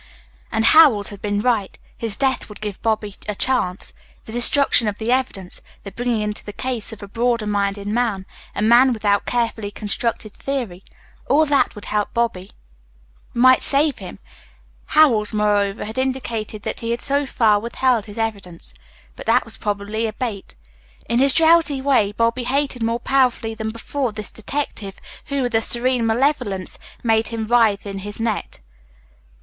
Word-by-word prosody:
And 220 0 +1
Howells 270 -11 +6
had 200 -2 -10
been 205 0 -1
right. 220 -5 0 0.2
His 225 -3 -1
death 265 -1 0
would 210 - -11
give 210 -2 -6
Bobby 215 -2 -1 0.2
a 210 - -2
chance. 200 -7 0 0.3
The - - -9
destruction 240 0 +3
of 205 -1 -2
the 225 +2 -2
evidence, 250 -8 -2 0.2
the 200 - -8
bringing 240 -1 -1
into 210 0 -4
the 205 - -8
case 245 -2 -3
of 220 -2 -10
a - - -7
broader 235 +1 0
minded 200 -1 -1
man, 215 -3 -1 0.3
a - - -1
man 245 +3 +5
without 205 -2 +1
a - - -29
carefully 230 -3 -1
constructed 215 +1 -3
theory 240 -10 -4 0.5
all 310 +3 +4
that 280 -4 +1
would 210 - -9
help 210 -1 -2
Bobby, 225 -5 -1 0.9
might 255 +2 +5
save 285 -1 +3
him. - - -9 0.7
Howells, 240 -10 +4
moreover, 205 -1 +1
had 220 +4 -5
indicated 235 -5 -3
that - - -4
he 230 - -4
had 235 0 -1
so 280 0 +1
far 215 -5 +3
withheld 235 0 0
his 205 - -10
evidence. 200 - -5 0.4
But - - -10
that - - +3
was 225 - -6
probably 210 +1 -2
a 215 - -5
bait. 215 -4 -5 0.5
In 235 +1 +1
his 275 +1 +7
drowsy 320 -2 +4
way 265 -7 +2
Bobby 230 +3 0
hated 275 -1 -1
more 230 +1 0
powerfully 250 -3 +1
than 220 0 -4
before 235 +3 -3
this 215 0 -7
detective 220 -4 -5 0.3
who, 280 -2 -2
with 245 -1 -2
a 225 - +3
serene 240 0 +1
malevolence, 225 -6 -1 0.2
made 225 -1 +2
him 225 -1 -4
writhe 220 -3 +3
in 195 -1 -5
his 205 +2 -7
net. 225 - -3
225 Hz, 170 wpm, -21 LUFS, 210-255 Hz, 0.9 s, his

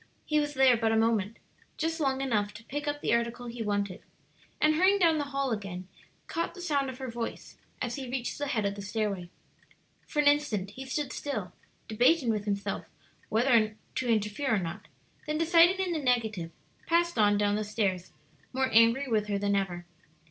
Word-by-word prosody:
He 305 -1 +2
was 295 0 -2
there 265 -2 +6
but 225 -1 +1
a 225 - +3
moment 225 -1 +1 0.4
just 325 +1 -1
long 270 -3 0
enough 210 -6 0
to 210 - -10
pick 290 +5 -5
up 290 0 -2
the - - +1
article 235 +1 -1
he 235 0 -6
wanted 205 -3 -2 0.6
and 305 0 +4
hurrying 375 +5 +4
down 330 -5 +3
the 290 - -1
hall 275 -2 -2
again, 195 -4 -4 0.4
caught 335 - -3
the - - -10
sound 285 -6 0
of 255 - -7
her 260 -1 -5
voice 235 -1 -6 0.3
as 240 0 -3
he 265 -3 -6
reached 250 +1 -3
the 290 - -2
head 225 -7 0
of 200 - 0
the 200 - -8
stairway. 200 -3 -2 0.8
For - - -9
an 295 -1 +4
instant 265 -10 +2
he 265 +5 -9
stood 285 +1 -2
still, 215 -11 -4 0.3
debating 245 +4 +3
with 210 -2 -2
himself 200 -1 -2 0.4
whether 220 -2 +3 0.2
to 255 - -2
interfere 220 +3 +1
or - - +1
not; 175 +2 -6 0.4
then 305 0 -1
deciding 335 +3 +5
in 380 -2 -1
the 320 - -1
negative, 225 - 0 0.4
passed 340 -4 +2
on 205 -1 +4
down 205 0 +2
the 215 - -1
stairs 195 -4 -1 0.4
more 260 0 +1
angry 230 +5 +5
with 215 -3 +1
her 205 -1 0
than 200 0 +1
ever. 180 -3 -2
235 Hz, 195 wpm, -29 LUFS, 205-290 Hz, 0.8 s, there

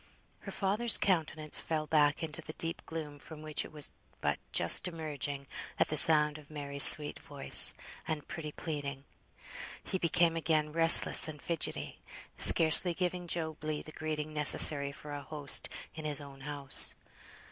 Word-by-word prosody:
Her - - -13
father's 215 +4 -2
countenance 155 -4 -4
fell 155 -2 -6
back 150 0 -2
into 160 +1 -8
the 155 - -13
deep 165 +2 -5
gloom 150 -3 -10
from 155 0 -15
which 155 -1 -5
it - - -15
was 150 -2 -4 0.3
but - - -5
just - - +1
emerging 145 -4 -8 0.3
at - - -2
the 155 - -6
sound 150 0 +6
of 145 - -21
Mary's 140 -2 0
sweet 150 -1 +7
voice, 145 -3 +4 0.3
and 155 -2 -8
pretty 155 -2 -10
pleading. 145 -4 -9 0.8
He 190 - -7
became 170 0 -2
again 155 -2 -4
restless 165 0 +6
and 155 -2 -12
fidgetty, 165 +1 -8 0.4
scarcely 165 +2 +4
giving 180 0 -7
Job 160 -2 -5
Legh 155 -1 -8
the 155 - -13
greeting 155 -1 -9
necessary 145 -1 +1
for 145 +1 -14
a 145 - -9
host 145 -1 -2 0.2
in 155 -1 -12
his 150 -2 +2
own 140 -2 -15
house. 140 -1 -1
155 Hz, 160 wpm, -28 LUFS, 145-165 Hz, 0.8 s, sweet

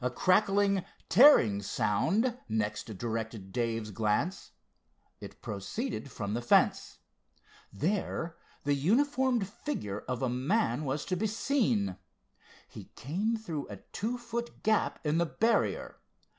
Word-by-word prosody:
A 125 - +2
crackling, 195 - +3 0.3
tearing 170 - +7
sound 205 - +1
next 110 -1 -1
directed 110 -3 -4
Dave's 115 -2 -2
glance. 110 - -1 0.7
It - - -11
proceeded 140 - -4
from 105 -4 -4
the 120 - -1
fence. 120 - +2 0.7
There 165 - -2 0.3
the 145 - +2
uniformed 245 - +2
figure 105 - -4
of 125 0 -2
a - - +2
man 150 - 0
was 135 +2 -2
to 185 - -1
be 215 +5 0
seen. 195 - 0 0.7
He - - -10
came 200 - -1
through 165 -10 -5
a 100 - -7
two 235 +4 -2
foot 235 0 -6
gap 215 -1 +2
in 150 +2 +2
the 170 - +2
barrier. 225 +7 0
155 Hz, 125 wpm, -30 LUFS, -, 0.7 s, tearing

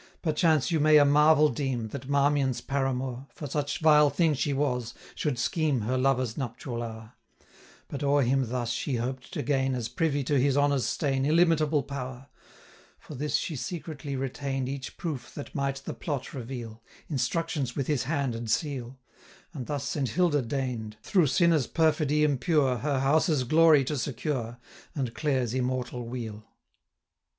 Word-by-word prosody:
Perchance 155 -2 +2
you 165 - +2
may 155 +1 +6
a 145 - +6
marvel 150 +1 +5
deem, 125 -4 -2
That 130 +3 -7
Marmion's 140 -2 +2
paramour 135 -1 -2
(For 150 - -7
such 145 +2 -2
vile 150 -2 +6
thing 165 0 +2
she 145 +1 -1
was) 130 -4 -1 0.2
should 145 -5 -2
scheme 145 +5 +1
665 105 - -4
Her 130 0 +1
lover's 130 -4 +1
nuptial 120 -1 -4
hour; 110 -1 -8 0.7
But 140 - -6
o'er 140 0 +3
him 130 0 +1
thus 120 -1 -2
she 125 +3 -2
hoped 125 +2 -4
to - - -2
gain, 135 -2 +1
As 115 -3 -3
privy 145 -4 0
to 140 +1 +1
his 135 +1 +2
honour's 145 -2 +2
stain, 135 -3 0
Illimitable 155 -1 +3
power: 130 -1 -7 0.7
For - - -12
this 150 +2 -2
she 160 - -1
secretly 150 -2 -5
retain'd 135 0 -3
670 - - -3
Each 135 -1 -7
proof 145 -8 -5
that 145 - -8
might 140 -1 -2
the - - -4
plot 140 -5 -4
reveal, 120 -3 -7 0.3
Instructions 145 -1 -1
with 140 - -1
his 145 -5 0
hand 140 -3 -1
and 115 0 -5
seal; 135 -1 -2 0.6
And 130 -7 -6
thus 145 -2 -2
Saint 135 -2 -1
Hilda 170 -5 +2
deign'd, 120 -4 -3
Through 180 - +3
sinners' 155 0 +3
perfidy 150 -2 +2
impure, 145 -2 +2
Her 140 0 -1
house's 150 +1 +2
glory 155 +2 +5
to 150 +3 -2
secure, 125 -3 -3 0.4
675 - - -4
And 125 -4 -2
Clare's 130 -6 0
immortal 125 -1 -2
weal. 110 -3 -6
135 Hz, 165 wpm, -28 LUFS, 125-150 Hz, 0.7 s, may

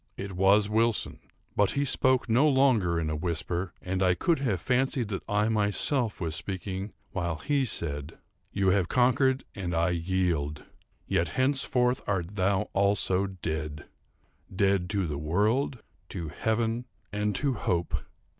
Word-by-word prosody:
It 100 0 -5
was 100 +3 +4
Wilson; 115 +1 0 0.4
but 100 -1 +2
he 140 0 0
spoke 130 -1 +2
no 125 +7 +4
longer 120 - +3
in 80 -1 -2
a - - -1
whisper, 85 +2 -2
and 95 +1 -2
I 90 -1 +3
could 165 - +1
have 115 -10 0
fancied 125 0 0
that 95 -3 -3
I 105 +1 +2
myself 110 +3 +1
was 80 -3 -2
speaking 95 +3 -4 0.2
while 85 -3 -2
he 140 - 0
said: 75 - 0 0.4
_"You 100 -1 +1
have 95 -2 +2
conquered, 130 +3 +2
and 90 -3 -3
I 85 +2 +2
yield. 85 -4 -1 0.4
Yet, 85 - +1
henceforward 130 -2 +2
art 95 -1 -2
thou 95 0 +2
also 100 -1 +2
dead—dead 90 +3 -4
to 100 -3 0
the 75 -3 -3
World, 110 - 0 0.3
to 85 -5 -5
Heaven 115 +6 -1 0.3
and 105 0 -1
to 140 -2 0
Hope! 85 -6 -1
100 Hz, 145 wpm, -28 LUFS, 85-115 Hz, 0.4 s, was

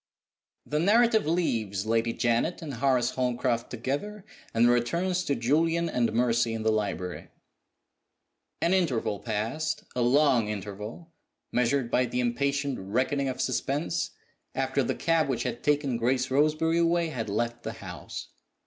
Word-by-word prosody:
THE 150 - -1
narrative 220 +2 +4
leaves 110 - 0
Lady 115 +1 +1
Janet 120 +11 0
and 145 -3 -5
Horace 125 -1 +2
Holmcroft 125 -2 -1
together, 145 - -4 0.3
and 115 +1 +4
returns 170 +10 +1
to 140 - +1
Julian 165 +7 +2
and 120 -3 +1
Mercy 115 0 +2
in 110 - -4
the 110 - +3
library. 100 -4 -2 1.4
An 170 - +3
interval 130 - +1
passed 130 +9 -2
a 125 - 0
long 125 -2 +4
interval, 105 - -6 0.4
measured 125 0 +1
by 125 0 +3
the 125 - -2
impatient 140 +3 0
reckoning 130 +8 0
of 130 0 -5
suspense 135 +6 -1 0.5
after - - +1
the - - -1
cab 165 -3 +1
which 120 -3 0
had 120 -1 -3
taken 145 -4 +1
Grace 125 +2 0
Roseberry 155 +4 +2
away 170 0 +2
had 115 -8 -4
left 120 +3 -1
the - - -5
house. - - -8
130 Hz, 140 wpm, -28 LUFS, 115-155 Hz, 1.4 s, narrative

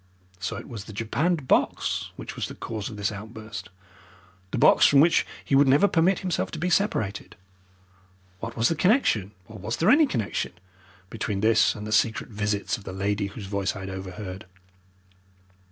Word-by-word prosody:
So 95 - -3
it - - -8
was 105 -4 -7
the 105 - -10
japanned 140 - -1
box - - +1
which - - -8
was - - -3
the - - -9
cause 110 -3 -5
of 105 - -9
this 100 +1 -1
outburst 110 -1 -8 0.8
the - - -3
box - - +6
from 140 - +5
which 165 +4 +4 0.2
he - - -3
would 140 +1 +6
never 145 +9 +5
permit 180 +1 +2
himself 185 -3 -1
to - - -4
be 180 +3 -1
separated. 110 - 0 1.0
What 115 +2 -6
was 115 +1 +3
the - - +2
connection, 160 - +2 0.2
or 110 -1 -11
was 105 +4 -3
there 175 +7 +4
any 300 +2 +6
connection 110 - -2 0.6
between 110 -3 -3
this 110 +1 +4
and 105 -1 -7
the 105 - -5
secret 110 +2 +1
visits 105 +1 -1
of - - -14
the 95 - -7
lady 100 +1 -1
whose 100 +1 -8
voice 100 0 -2
I 100 - -6
had 95 0 -6
overheard? 95 +1 -7
110 Hz, 185 wpm, -26 LUFS, 100-140 Hz, 1.0 s, box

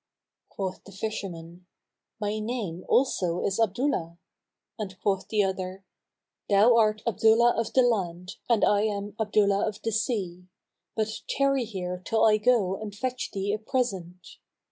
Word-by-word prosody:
Quoth 190 -2 -5
the 200 - -13
fisherman, 180 -4 -6 0.5
"My 210 0 -2
name 215 -6 -4
also 180 -10 +2
is 195 +2 -1
Abdullah;" 205 - 0 0.6
and 190 -3 -6
quoth 195 -2 0
the 210 -2 +2
other, 190 0 -4 0.6
"Thou 210 +4 +6
art 215 -2 +3
Abdullah 235 +1 +4
of 230 -1 -1
the 260 - +5
land 185 -5 -1
and 230 -3 +4
I 205 0 +3
am 205 -1 -2
Abdullah 205 -2 +2
of 215 -1 -4
the 225 - -1
Sea; 190 -5 -2 0.5
but 220 0 -2
tarry 275 -2 +2
here 180 -4 -5
till 225 +3 +2
I 215 -1 +5
go 210 -4 +2
and 205 -2 -6
fetch 255 +3 -3
thee 200 +1 -2
a 215 - -2
present." 190 -7 -3
205 Hz, 145 wpm, -27 LUFS, 185-225 Hz, 0.6 s, Thou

